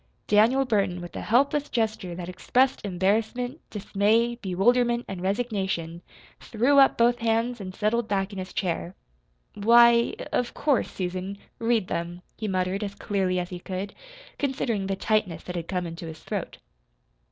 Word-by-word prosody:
Daniel 235 +6 +4
Burton, 200 -7 0
with 175 0 -9
a - - -4
helpless 280 +5 +2
gesture 215 -6 -1
that 175 0 -6
expressed 255 +8 +1
embarrassment, 220 - -1
dismay, 215 +3 +1
bewilderment, 235 +4 +1
and 190 -2 -6
resignation, 190 -5 -2 0.4
threw 250 +5 +2
up 270 - +5
both 240 +1 +3
hands 230 +1 0
and 185 -1 -7
settled 220 +2 0
back 200 -1 -1
in 195 - -5
his 185 0 -6
chair. 175 0 -2 0.6
"Why, 235 +2 +5
of - - -5
of 245 - 0
course, 285 -5 +1
Susan, 185 +2 -4 0.2
read 230 -4 +1
them," 175 +1 -4
he 215 - -4
muttered 185 +1 -1
as 200 -1 -5
clearly 190 -3 -1
as 180 0 -3
he 180 - -5
could, 190 +3 -5 0.5
considering 235 -8 -1
the 195 - -1
tightness 190 -5 0
that 180 - -6
had 170 -1 -4
come 180 -2 -2
into 165 0 -7
his 160 -1 -9
throat. - - -4
205 Hz, 160 wpm, -26 LUFS, 185-235 Hz, 0.6 s, up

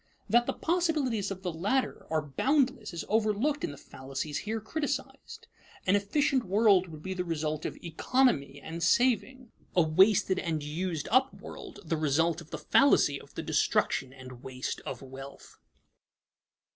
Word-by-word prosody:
That 240 +3 +3
the - - 0
possibilities 305 - 0
of 190 -1 -6
the 180 -3 -2
latter 205 +11 -1
are 155 -1 0
boundless 255 - 0
is 170 - -5
overlooked 220 +7 +1
in - - -1
the 145 - -9
fallacies 135 +3 -5
here 220 +1 -3
criticized. 275 +3 -4 0.4
An 190 - +4
efficient 260 +6 +1
world 200 -2 +4
would 155 -2 -11
be 190 - -3
the 180 -1 -2
result 155 -2 -2
of - - -4
"economy" 165 - +1
and 165 +4 -7
saving; 245 +6 +1 0.2
a 175 - +5
wasted 190 +4 +4
and 160 -4 -2
used 160 +2 -3
up 260 +3 +4
world, 390 -4 -10
the 165 0 -1
result 160 +2 +1
of 165 - -14
the - - -5
fallacy 150 - +4
of - - -18
the - - -4
destruction 130 - +1
and 130 -2 -11
waste 130 0 -5
of - - -6
wealth. 135 +1 -11
185 Hz, 160 wpm, -29 LUFS, 155-250 Hz, 0.4 s, a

